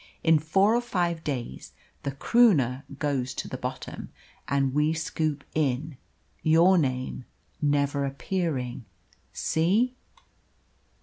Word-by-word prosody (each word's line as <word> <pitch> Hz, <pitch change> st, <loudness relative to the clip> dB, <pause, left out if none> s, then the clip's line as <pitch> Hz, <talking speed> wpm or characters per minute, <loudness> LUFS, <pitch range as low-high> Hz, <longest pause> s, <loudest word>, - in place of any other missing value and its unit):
In 160 Hz, -1 st, +5 dB
four 195 Hz, +8 st, +3 dB
or 240 Hz, -, +2 dB
five 175 Hz, -8 st, -1 dB
days 120 Hz, -, -5 dB, 0.3 s
the 140 Hz, -, -3 dB
Croonah 140 Hz, -, +3 dB
goes 135 Hz, -4 st, -1 dB
to -, -, -4 dB
the -, -, -5 dB
bottom, -, -, -6 dB, 0.4 s
and 135 Hz, -2 st, +1 dB
we 150 Hz, +2 st, +2 dB
scoop 155 Hz, -2 st, -2 dB
in, 150 Hz, 0 st, -1 dB, 0.5 s
your 170 Hz, +4 st, +5 dB
name 130 Hz, -3 st, -2 dB, 0.4 s
never 145 Hz, -1 st, +1 dB
appearing 135 Hz, -, -2 dB, 0.5 s
see?" 205 Hz, +11 st, +1 dB
150 Hz, 110 wpm, -27 LUFS, 135-170 Hz, 0.5 s, In